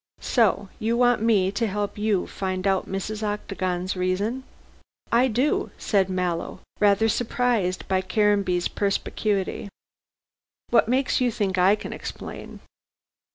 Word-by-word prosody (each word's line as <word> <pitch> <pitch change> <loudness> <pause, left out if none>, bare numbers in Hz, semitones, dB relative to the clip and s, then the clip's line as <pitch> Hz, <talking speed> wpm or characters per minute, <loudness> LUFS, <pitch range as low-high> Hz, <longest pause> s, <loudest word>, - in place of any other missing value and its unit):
"So 205 -5 +2
you 230 +2 0
want 245 -2 +3
me 205 -5 +3
to 225 +3 -1
help 205 0 -2
you 210 -3 +1
to - - -6
find 185 -1 -3
out 195 -1 +1
Mrs. 210 +3 -4
Octagon's 185 -3 -2
reason?" 195 +8 -1 0.7
"I 240 +3 +4
do," 255 +5 +1
said 195 -3 +1
Mallow, 180 -2 -2 0.2
rather 205 +1 +4
surprised 230 -4 0
by 190 -1 +1
Caranby's 195 -2 +1
perspicuity. 200 0 -1 1.0
"What 235 - +4
makes 260 +1 +1
you 250 - +3
think 195 -4 -1
I 190 +3 +5
can 215 - -7
explain?" - - -8
205 Hz, 130 wpm, -24 LUFS, 185-225 Hz, 1.0 s, I